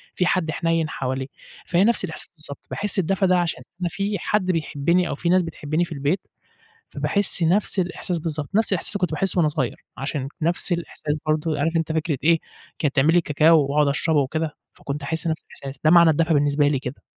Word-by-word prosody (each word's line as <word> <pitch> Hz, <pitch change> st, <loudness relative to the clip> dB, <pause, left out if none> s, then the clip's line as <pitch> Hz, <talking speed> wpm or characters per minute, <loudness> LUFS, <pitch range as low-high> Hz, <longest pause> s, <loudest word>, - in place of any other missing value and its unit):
في 180 Hz, -, +1 dB
حد 175 Hz, -3 st, +1 dB
حنين 165 Hz, 0 st, 0 dB
حواليه، 130 Hz, 0 st, -3 dB, 0.4 s
فهي 180 Hz, +2 st, +3 dB
نفس 230 Hz, -3 st, +2 dB
الإحساس 160 Hz, -, -8 dB
بالضبط 150 Hz, -2 st, -7 dB
باحس 205 Hz, -1 st, 0 dB
الدفا 190 Hz, +3 st, +1 dB
ده 185 Hz, -1 st, +4 dB
عشان 170 Hz, -2 st, -2 dB, 0.2 s
إن -, -, +2 dB
في 200 Hz, +1 st, -2 dB
حد 210 Hz, -3 st, 0 dB
بيحبني 170 Hz, 0 st, +1 dB
أو -, -, -2 dB
في 170 Hz, +4 st, -2 dB
ناس 185 Hz, +1 st, +4 dB
بتحبني 165 Hz, 0 st, -2 dB
في -, -, -16 dB
البيت 145 Hz, +4 st, 0 dB, 0.7 s
فباحس 200 Hz, -3 st, 0 dB
نفس 190 Hz, +4 st, +1 dB
الإحساس 180 Hz, -1 st, -2 dB
بالضبط، 155 Hz, -3 st, -4 dB
نفس 220 Hz, 0 st, +3 dB
الإحساس 180 Hz, -, -1 dB
اللي -, -, 0 dB
كنت 180 Hz, -, +1 dB
باحسه 185 Hz, +5 st, 0 dB
وأنا 165 Hz, -3 st, +4 dB
صغير، 140 Hz, -5 st, -2 dB
عشان 135 Hz, 0 st, -3 dB
نفس 170 Hz, +3 st, 0 dB
الإحساس 155 Hz, -3 st, -2 dB
برضه 155 Hz, 0 st, 0 dB
عارف 160 Hz, +3 st, 0 dB
أنت 165 Hz, -1 st, 0 dB
فكرة 155 Hz, -2 st, -1 dB
إيه 165 Hz, +1 st, +4 dB, 0.4 s
كانت 145 Hz, -2 st, 0 dB
تعمل 150 Hz, +4 st, +4 dB
لي 175 Hz, -, +5 dB
كاكاو 155 Hz, 0 st, +4 dB
وأقعد 150 Hz, 0 st, +3 dB
أشربه 150 Hz, +2 st, +2 dB
وكده، 150 Hz, +3 st, -2 dB, 0.2 s
فكنت 140 Hz, +1 st, -6 dB
أحس 160 Hz, +3 st, -3 dB
نفس 160 Hz, -1 st, -1 dB
الإحساس 135 Hz, -1 st, -10 dB
ده، 155 Hz, -, +5 dB
معنى 170 Hz, -2 st, +7 dB
الدفا 160 Hz, +1 st, +2 dB
بالنسبة 145 Hz, 0 st, +3 dB
لي 145 Hz, -2 st, +1 dB
كده. 125 Hz, +2 st, -7 dB
160 Hz, 205 wpm, -23 LUFS, 145-175 Hz, 0.7 s, معنى